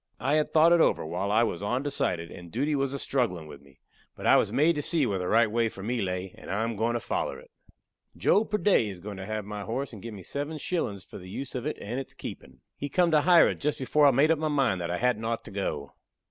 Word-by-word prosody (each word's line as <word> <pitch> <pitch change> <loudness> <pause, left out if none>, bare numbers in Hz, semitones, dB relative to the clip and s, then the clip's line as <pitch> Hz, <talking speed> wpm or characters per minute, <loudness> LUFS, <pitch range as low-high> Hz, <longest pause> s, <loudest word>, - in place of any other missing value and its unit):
I 135 +5 0
had 155 0 +2
thought 160 +2 +5
it 170 - +5
over, - - +2
while 90 +5 -2
I 110 +3 +4
was 100 -6 -2
ondecided 105 -7 -1
and 85 -1 -11
duty 145 +6 0
was 135 -2 0
a 140 - -3
strugglin' 115 - -1
with 75 -2 -11
me. 70 -1 -21 0.4
But - - -8
I - - +6
was - - +3
made 155 +4 +4
to - - 0
see 155 -1 +1
where 100 -5 -1
the 90 - -3
right 115 +1 +3
way 115 0 +1
for 95 - -10
me 120 +2 -1
lay, 90 -1 -3
and - - -11
I 105 +3 0
am 115 0 -2
goin' 115 +3 0
to - - 0
foller - - -3
it. - - -18 0.7
Joe 205 - +3
Purday 205 - +2
is 95 -3 -8
goin' 100 +2 -7
to 95 0 -7
have 110 -1 -3
my 105 0 -6
horse, 120 +7 -4
and 105 - -9
give 115 0 -7
me 95 - -10
seven 145 - -4
shillin's 120 - -2
for - - -11
the 90 0 -11
use 135 +7 -6
of 125 - -3
it - - -3
and 120 +6 -4
its 135 - -8
keepin'. - - -9
He 145 - -5
come 175 +3 +2
to 155 -1 +5
hire 175 +1 +6
it - - -4
just 150 +1 -1
before 145 +3 +3
I - - +8
made 140 +4 +4
up 160 - +2
my 155 - 0
mind 135 -11 +1
that 85 - -3
I 90 - -1
hadn't 120 -1 +1
ort 115 0 -2
to - - -11
go. 75 -8 -3
115 Hz, 275 wpm, -28 LUFS, 95-145 Hz, 0.7 s, I